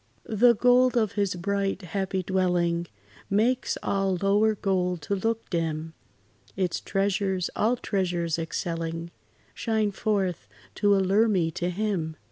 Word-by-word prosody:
The 235 Hz, +2 st, +4 dB
gold 250 Hz, +2 st, +4 dB
of 215 Hz, -4 st, +2 dB
his 200 Hz, -3 st, -1 dB
bright, 195 Hz, +2 st, -1 dB
happy 190 Hz, +1 st, -2 dB
dwelling 175 Hz, -2 st, +1 dB, 0.4 s
Makes 235 Hz, +6 st, +1 dB
all 195 Hz, -2 st, 0 dB
lower 205 Hz, +3 st, +3 dB
gold 180 Hz, -4 st, -1 dB
to 200 Hz, -, -1 dB
look 225 Hz, +3 st, -2 dB
dim; 160 Hz, -2 st, -2 dB, 0.6 s
Its 185 Hz, -3 st, -1 dB
treasures, 195 Hz, -2 st, -1 dB
all 230 Hz, +4 st, +2 dB
treasures 175 Hz, -7 st, -1 dB
excelling, 165 Hz, 0 st, -3 dB, 0.4 s
Shine 220 Hz, -2 st, 0 dB
forth 190 Hz, -, -1 dB, 0.3 s
to 205 Hz, -1 st, +3 dB
allure 195 Hz, +4 st, +3 dB
me 180 Hz, -6 st, +1 dB
to 175 Hz, +2 st, -2 dB
Him. 180 Hz, -5 st, -2 dB
195 Hz, 125 wpm, -26 LUFS, 175-210 Hz, 0.6 s, The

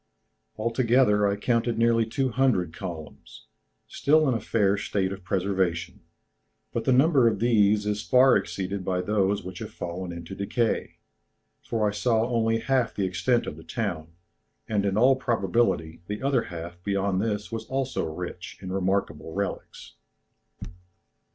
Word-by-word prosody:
Altogether 115 Hz, -2 st, +3 dB
I 100 Hz, -, +1 dB
counted 115 Hz, +2 st, 0 dB
nearly 115 Hz, -1 st, +3 dB
two 130 Hz, +3 st, 0 dB
hundred 115 Hz, -10 st, +1 dB
columns, 85 Hz, -5 st, -9 dB, 0.4 s
still 155 Hz, +1 st, +3 dB
in 130 Hz, -, +2 dB
a 115 Hz, -, -1 dB
fair 100 Hz, -3 st, +2 dB
state 100 Hz, -2 st, -1 dB
of 100 Hz, -2 st, -7 dB
preservation; 90 Hz, -3 st, -1 dB, 0.7 s
but -, -, -2 dB
the -, -, +3 dB
number 135 Hz, -1 st, +5 dB
of 110 Hz, -, +1 dB
these 105 Hz, -3 st, +3 dB
is 105 Hz, 0 st, -1 dB
far 130 Hz, +2 st, +5 dB
exceeded 95 Hz, 0 st, -2 dB
by 90 Hz, 0 st, -1 dB
those 100 Hz, 0 st, 0 dB
which 90 Hz, 0 st, -8 dB
have -, -, -7 dB
fallen 90 Hz, +1 st, -5 dB
into 85 Hz, +2 st, -8 dB
decay, 110 Hz, +4 st, -1 dB, 0.7 s
for 110 Hz, -2 st, 0 dB
I -, -, +1 dB
saw 115 Hz, +1 st, +1 dB
only 115 Hz, -2 st, +1 dB
half 130 Hz, -2 st, 0 dB
the 100 Hz, -, 0 dB
extent 95 Hz, +7 st, +1 dB
of 75 Hz, -, -6 dB
the 80 Hz, -, -11 dB
town, 85 Hz, -9 st, -4 dB, 0.5 s
and 100 Hz, -2 st, 0 dB
in 95 Hz, +1 st, 0 dB
all 130 Hz, +4 st, +5 dB
probability 105 Hz, -9 st, 0 dB
the 105 Hz, +4 st, -5 dB
other 135 Hz, -3 st, +1 dB
half 85 Hz, +1 st, -8 dB
beyond 100 Hz, -1 st, 0 dB
this 105 Hz, -1 st, -2 dB
was 115 Hz, -1 st, -4 dB
also 130 Hz, -10 st, -2 dB
rich 90 Hz, +1 st, -7 dB
in 95 Hz, -1 st, -7 dB
remarkable 95 Hz, -5 st, -1 dB
relics." 100 Hz, 0 st, -5 dB
105 Hz, 150 wpm, -26 LUFS, 95-115 Hz, 0.7 s, number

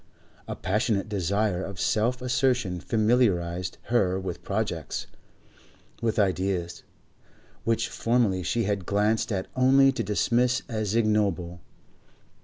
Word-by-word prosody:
A -, -, -4 dB
passionate 105 Hz, +1 st, 0 dB
desire 100 Hz, -1 st, 0 dB
of 95 Hz, 0 st, -7 dB
self 125 Hz, +4 st, 0 dB
assertion 125 Hz, -7 st, +1 dB
familiarised 90 Hz, -6 st, +1 dB, 0.2 s
her 95 Hz, -5 st, +2 dB
with 95 Hz, -2 st, -5 dB
projects, -, -, -3 dB, 1.0 s
with 115 Hz, -2 st, 0 dB
ideas, 90 Hz, -3 st, 0 dB, 0.8 s
which 115 Hz, -1 st, +1 dB
formerly 115 Hz, -6 st, +1 dB
she 115 Hz, +6 st, 0 dB
had 100 Hz, -3 st, -2 dB
glanced 105 Hz, +3 st, +1 dB
at 95 Hz, -2 st, -1 dB
only 135 Hz, +1 st, +5 dB
to 130 Hz, -3 st, -3 dB
dismiss 120 Hz, +4 st, +1 dB
as 110 Hz, -2 st, -2 dB
ignoble. 100 Hz, -6 st, 0 dB
105 Hz, 110 wpm, -26 LUFS, 95-120 Hz, 1.0 s, only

